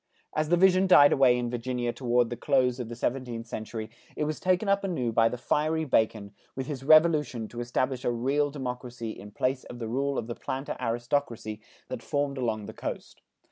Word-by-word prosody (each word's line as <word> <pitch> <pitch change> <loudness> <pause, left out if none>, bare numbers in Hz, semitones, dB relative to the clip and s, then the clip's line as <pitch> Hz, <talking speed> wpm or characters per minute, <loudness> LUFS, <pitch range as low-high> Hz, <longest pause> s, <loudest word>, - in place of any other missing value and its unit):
As 155 0 0
the 175 - +4
vision 190 +1 +5
died 145 -6 +8
away 130 -3 +5
in 120 -1 -2
Virginia 120 0 -2
toward 120 -2 +1
the - - -2
close 130 -2 +1
of 120 -2 -5
the 120 - -6
seventeenth 120 -1 -3
century, 110 -1 -6 0.2
it - - -1
was 150 0 -2
taken 185 +3 +1
up 200 0 +2
anew 135 -12 -1
by 115 0 +4
the 125 - -5
fiery 155 +5 0
Bacon 110 -6 +1 0.2
with 135 - -3
his 135 -2 -5
revolution 150 -6 +4
to 120 - -8
establish 125 +1 -1
a - - +1
real 135 +5 +1
democracy 125 -4 -5
in 105 -1 -10
place 130 +5 -1
of 120 - -9
the 115 -2 -5
rule 140 +4 -1
of 115 - -2
the 120 - -4
planter 135 +4 -4
aristocracy, 115 -2 -2 0.3
that - - -5
formed 140 -1 -2
along 110 -4 -1
the - - -8
coast. - - -6
125 Hz, 200 wpm, -28 LUFS, 120-145 Hz, 0.3 s, died